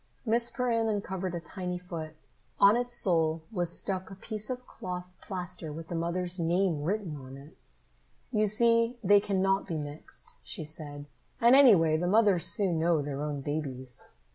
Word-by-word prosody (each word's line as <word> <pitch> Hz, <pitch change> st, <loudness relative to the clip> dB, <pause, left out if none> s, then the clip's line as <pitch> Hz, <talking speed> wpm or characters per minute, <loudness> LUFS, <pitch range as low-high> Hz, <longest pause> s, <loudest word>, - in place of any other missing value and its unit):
Miss 235 Hz, +1 st, +2 dB
Perrin 235 Hz, -3 st, 0 dB
uncovered 190 Hz, -3 st, -3 dB
a -, -, -2 dB
tiny 180 Hz, +1 st, -5 dB
foot. 165 Hz, -3 st, -7 dB, 0.4 s
On 200 Hz, +2 st, +7 dB
its 245 Hz, 0 st, -1 dB
sole 165 Hz, -8 st, +1 dB
was 175 Hz, -5 st, 0 dB
stuck 190 Hz, -2 st, -3 dB
a 195 Hz, -, -9 dB
piece 215 Hz, +2 st, -4 dB
of 250 Hz, 0 st, -4 dB
cloth 180 Hz, -3 st, -7 dB
plaster 180 Hz, -4 st, -5 dB
with 160 Hz, +2 st, -8 dB
the 175 Hz, -, -3 dB
mother's 175 Hz, +2 st, -2 dB
name 170 Hz, -1 st, +1 dB
written 180 Hz, 0 st, -2 dB
on 135 Hz, -1 st, -10 dB
it. 140 Hz, +2 st, -14 dB, 0.8 s
"You 215 Hz, 0 st, +2 dB
see 230 Hz, +3 st, +3 dB
they 205 Hz, +1 st, +6 dB
cannot 195 Hz, -1 st, +1 dB
be 165 Hz, -4 st, -2 dB
mixed," 145 Hz, 0 st, -7 dB
she -, -, -5 dB
said. 150 Hz, -2 st, -4 dB, 0.3 s
"And, 235 Hz, +3 st, +6 dB
anyway, 185 Hz, -, +6 dB
the 175 Hz, +2 st, -1 dB
mothers 195 Hz, -4 st, +3 dB
soon 170 Hz, -1 st, +3 dB
know 165 Hz, -2 st, +2 dB
their 140 Hz, 0 st, -4 dB
own 150 Hz, -2 st, -3 dB
babies." 135 Hz, -4 st, -4 dB
180 Hz, 165 wpm, -29 LUFS, 160-205 Hz, 0.8 s, On